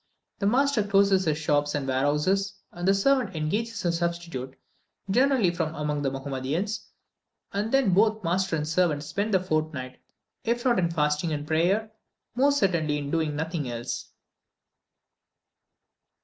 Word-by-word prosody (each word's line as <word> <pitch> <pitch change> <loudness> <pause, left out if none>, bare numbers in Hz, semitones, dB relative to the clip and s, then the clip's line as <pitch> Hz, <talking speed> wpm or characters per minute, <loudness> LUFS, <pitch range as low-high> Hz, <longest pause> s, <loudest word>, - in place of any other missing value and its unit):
The 200 - +1
master 265 +1 +3
closes 200 -1 +3
his 155 -2 +1
shops 145 -1 +1
and 140 -2 -2
warehouses, 150 +9 +1 0.2
and 175 +1 -4
the 195 - +6
servant 245 -2 +2
engages 210 +7 -2
a 175 - +3
substitute, 170 -6 -3 0.5
generally 250 -4 +3
from 165 -2 -3
among 150 -1 -2
the 140 - +1
Mahomedans, 135 +9 -3 0.7
and 205 +3 -1
then 270 -9 +3
both 215 +2 +3
master 180 +1 0
and 150 -1 -2
servant 160 -3 +1
spend 200 +7 -2
the 190 - +4
fortnight, 155 -7 -3 0.4
if 235 +2 -1
not 240 -6 +3
in 170 -2 +1
fasting 150 0 0
and 145 -1 -3
prayer, 180 +8 +1 0.4
most 280 +4 +3
certainly 165 - +1
in 145 -1 -4
doing 160 -3 0
nothing 160 -3 -3
else. 120 +1 -5
170 Hz, 145 wpm, -26 LUFS, 150-200 Hz, 0.7 s, the